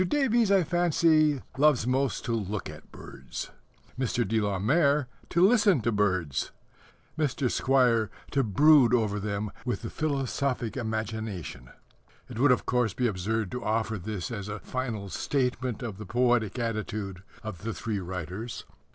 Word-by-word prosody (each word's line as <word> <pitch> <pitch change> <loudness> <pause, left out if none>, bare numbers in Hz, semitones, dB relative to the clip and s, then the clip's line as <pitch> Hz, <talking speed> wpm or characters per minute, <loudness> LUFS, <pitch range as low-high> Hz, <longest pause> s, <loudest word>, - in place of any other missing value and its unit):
Davies, 240 -4 +2
I 195 -2 +5
fancy, 160 -4 +3 0.2
loves 145 -6 +4
most 130 +1 0
to 120 - -2
look 105 -2 -3
at - - -14
birds; 65 -1 -8 0.5
Mr. 125 -3 0
de 110 +2 +1
la 100 -2 0
Mare 140 - +2 0.2
to 170 +2 +4
listen 205 - +4
to 115 +2 0
birds; 95 - 0 0.7
Mr. 135 -4 0
Squire 125 -5 +3 0.2
to 140 - +2
brood 125 +2 +5
over 105 -3 0
them 105 0 -3
with 125 -1 -3
the 115 - -5
philosophic 135 -5 -1
imagination. 110 - -4 0.6
It 110 - -7
would, 140 +1 +5
of 125 - +2
course, 125 -4 +1
be 125 - 0
absurd 110 0 -1
to 125 - -4
offer 110 0 -1
this 95 -1 -5
as 100 -3 -5
a 105 0 -4
final 115 -5 -4
statement 125 -1 -1
of 105 -4 -5
the 105 - -6
poetic 120 -2 +1
attitude 110 -5 -3 0.2
of 110 -6 -6
the 115 - -3
three 110 -2 -3
writers. 95 +5 -6
115 Hz, 150 wpm, -28 LUFS, 105-135 Hz, 0.7 s, I